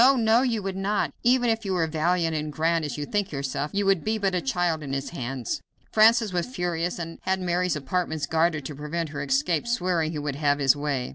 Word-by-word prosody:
no! 225 +2 +5
you 235 -5 0
would 195 -1 -3
not; 200 +2 0
even 245 0 +3
were 225 -1 +3
you 190 -4 -1
as 165 -1 +1
valiant 165 +1 +1
and 150 0 -2
grand 165 +2 +1
as 150 - -4
you 145 - -3
think 205 +4 -1
yourself, 140 +1 -2
you 200 0 0
would 195 -4 +3
be 220 +1 0
but 195 -3 0
a 180 - +1
child 175 -10 0
in 140 -2 -5
his 135 0 -3
hands." 130 -5 -4 0.3
Francis 220 -1 +5
was 175 -1 0
furious, 175 -6 -2
and 165 -1 -6
had 190 0 0
Mary's 180 -1 0
apartments 155 +1 -2
guarded 160 -1 +1
to 150 - -5
prevent 150 +3 -3
her 145 - -5
escape, 145 - 0
swearing 180 -8 0
he 160 - -4
would 145 -2 -3
have 145 -1 +2
his 135 -2 +4
way. 145 -3 -2
170 Hz, 225 wpm, -26 LUFS, 150-190 Hz, 0.3 s, no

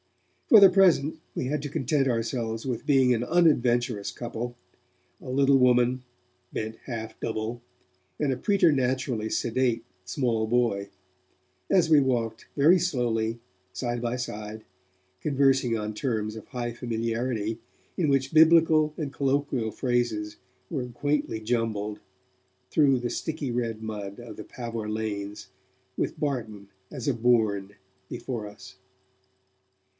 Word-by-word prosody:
For 220 - +9
the 195 -1 +9
present, 170 -5 +3 0.2
we - - -2
had 145 +2 -1
to 145 - -5
content 135 +1 +1
ourselves 115 -1 -2
with 125 -3 -4
being 130 -3 +5
an 120 0 0
unadventurous 120 - +2
couple 120 +1 -5 0.6
a - - -9
little 135 +1 +4
woman, 125 0 +3 0.5
bent 110 0 -4
half 115 -3 -5
double, 110 +2 -3 0.6
and 145 -3 +1
a - - -4
preternaturally 130 - +1
sedate 120 +1 0 0.2
small 110 +3 -1
boy 110 -4 +1 0.8
as 175 -3 +4
we 155 -2 +6
walked 115 -4 -1
very 165 +6 +6
slowly, 120 -8 0 0.3
side 120 +4 -3
by 120 0 -1
side, 110 -3 -6 0.6
conversing 135 -4 +2
on 105 0 -4
terms 110 -2 -2
of 110 - -10
high 120 -2 -4
familiarity, 115 -1 -2 0.4
in 165 -5 +1
which 135 0 +1
Biblical 160 -1 +5
and 145 -4 -4
colloquial 135 -4 0
phrases 120 -5 -1 0.3
were 130 -4 -3
quaintly 145 -1 -1
jumbled, 110 -2 -2 0.7
through 140 -4 +4
the 120 0 -3
sticky 155 -5 -3
red 115 -2 -2
mud 105 -2 -6
of 120 -3 -9
the 105 - -8
Pavor 115 -3 -5
lanes 105 -2 -4 0.5
with - - -2
Barton 110 -8 -3 0.2
as 130 -5 -6
a 140 - +3
bourne 110 -4 +1 0.3
before 115 -5 -5
us. 100 -2 -13
120 Hz, 130 wpm, -27 LUFS, 110-135 Hz, 0.8 s, For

